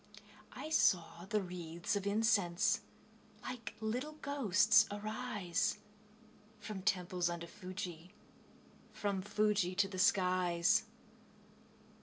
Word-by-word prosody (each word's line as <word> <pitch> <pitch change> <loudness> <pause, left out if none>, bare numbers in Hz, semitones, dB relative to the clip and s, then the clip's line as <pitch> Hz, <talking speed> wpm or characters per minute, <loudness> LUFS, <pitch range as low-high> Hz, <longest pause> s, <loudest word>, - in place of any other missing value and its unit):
I 310 - -7
saw 180 - +2
the 210 -2 +1
wreathes 175 0 -4
of 200 0 -2
incense 200 -4 +2 0.6
Like 235 -3 -6
little 245 +8 -3
ghosts 220 - +3
arise, 205 -3 -2 0.8
From 210 -2 -6
temples 180 -3 0
under 170 0 -4
Fuji, 180 -2 -7 0.8
From 200 -2 -2
Fuji 205 -2 +1
to 195 +1 +3
the 190 -1 -6
skies. 185 -4 +3
195 Hz, 95 wpm, -35 LUFS, 180-215 Hz, 0.8 s, ghosts